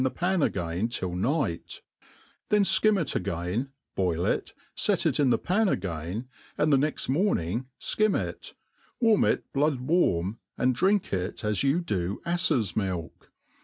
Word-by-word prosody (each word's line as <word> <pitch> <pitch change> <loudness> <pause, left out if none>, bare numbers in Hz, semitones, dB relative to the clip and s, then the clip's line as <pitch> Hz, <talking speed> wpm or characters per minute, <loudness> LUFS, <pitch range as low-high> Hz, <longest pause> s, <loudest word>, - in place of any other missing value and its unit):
^the 130 0 +1
pan 175 +5 0
again 90 - -1
till 95 -7 -3
night; 115 - -2 0.7
then 210 -1 +4
fkim 210 +1 +4
it 160 - -2
again, 90 +7 -2 0.2
boll 90 -2 0
it, - - -1 0.2
fet - - +1
it - - +2
in 140 -3 +4
the - - +4
pari 200 +3 +1
ag|»in, 90 +6 -4 0.3
and 150 0 +3
the - - +6
ne^^t 150 +3 -1
mornipg 130 - 0
fkim 215 -1 +1
it, - - -6 0.4
warm 225 -4 +4
it - - +1
blood 145 -1 +1
warm, 115 - +1 0.2
and 130 +1 +2
drink 190 - +1
it 90 +2 -3
a$ 105 0 +1
you 140 +6 +2
do 95 - -2
aftes 170 - +1
milk. 95 -5 -4
125 Hz, 155 wpm, -27 LUFS, -, 0.7 s, the